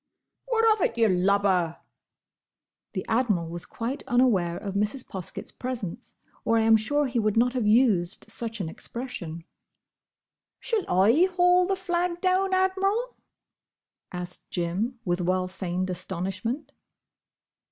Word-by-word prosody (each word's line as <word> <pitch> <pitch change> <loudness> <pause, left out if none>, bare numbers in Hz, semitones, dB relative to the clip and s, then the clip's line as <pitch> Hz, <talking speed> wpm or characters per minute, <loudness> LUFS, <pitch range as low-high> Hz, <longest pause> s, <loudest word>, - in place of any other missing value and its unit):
"What 455 -2 +2
of 425 - -5
it, 230 - 0
you 230 -1 +4
lubber?" 185 -2 +2 1.2
The 190 - -3
Admiral 210 -9 +1
was 170 0 -5
quite 245 +5 -4
unaware 215 -9 +2
of 200 -2 -5
Mrs. 210 +6 0
Poskett's 185 -3 -6
presence, 245 -3 -6 0.3
or 230 - +2
I - - +4
am 225 0 +6
sure 290 +7 +1
he 245 -3 -1
would 215 -1 +1
not 245 +2 +3
have 245 -5 0
used 210 -6 +3
such 225 0 -5
an 185 - -2
expression. 170 -4 -6 1.2
"Shall 450 -5 -1
I 220 - +5
haul 360 0 +4
the 390 - +1
flag 350 -2 -1
down, 375 +1 +2
Admiral?" 390 +6 +1 1.0
asked 180 0 -7
Jim, 190 +9 -2
with 175 0 0
well 185 +1 +1
feigned 185 0 -3
astonishment. 190 - -4
225 Hz, 130 wpm, -26 LUFS, 185-290 Hz, 1.2 s, am